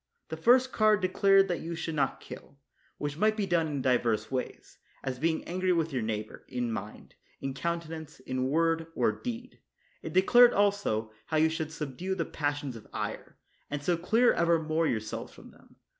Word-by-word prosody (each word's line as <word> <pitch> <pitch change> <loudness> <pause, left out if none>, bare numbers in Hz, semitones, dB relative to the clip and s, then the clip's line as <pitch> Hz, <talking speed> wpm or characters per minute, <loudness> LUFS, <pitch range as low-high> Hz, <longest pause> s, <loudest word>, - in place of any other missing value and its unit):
The 160 - -3
first 250 +10 +4
card 215 -2 +4
declared 195 +1 +4
that 175 -3 -1
you 170 +1 -4
should 165 0 -4
not 140 -4 0
kill, 140 - -11 0.4
which 145 +1 -4
might 215 +1 +3
be 205 - 0
done 170 -3 +1
in 140 -3 -3
divers 120 -3 +1
ways, 130 -1 -5 0.2
as 130 -2 -3
being 160 +2 0
angry 185 +1 -1
with 165 -3 0
your 125 - 0
neighbor, 110 -1 -4
in 120 -2 -2
mind, 105 -1 -7 0.3
in 135 -1 -4
counte 170 +4 -2
nance, 160 -3 -8
in 130 0 -2
word, 165 +2 +1
or - - +2
deed; 245 0 -7 0.4
it - - -6
declared 240 +7 +6
also, 200 - +1 0.2
how 155 - 0
you 160 +1 +4
should 160 -1 -3
subdue 160 +5 -4
the - - -1
passions 145 -4 -3
of 110 - -11
ire, - - -5 0.3
and 145 0 -4
so 175 +3 +2
clear 225 +9 +3
evermore 165 -1 +2
yourselves 110 -4 -3
from - - -14
them. - - -22
160 Hz, 185 wpm, -29 LUFS, 135-185 Hz, 0.4 s, declared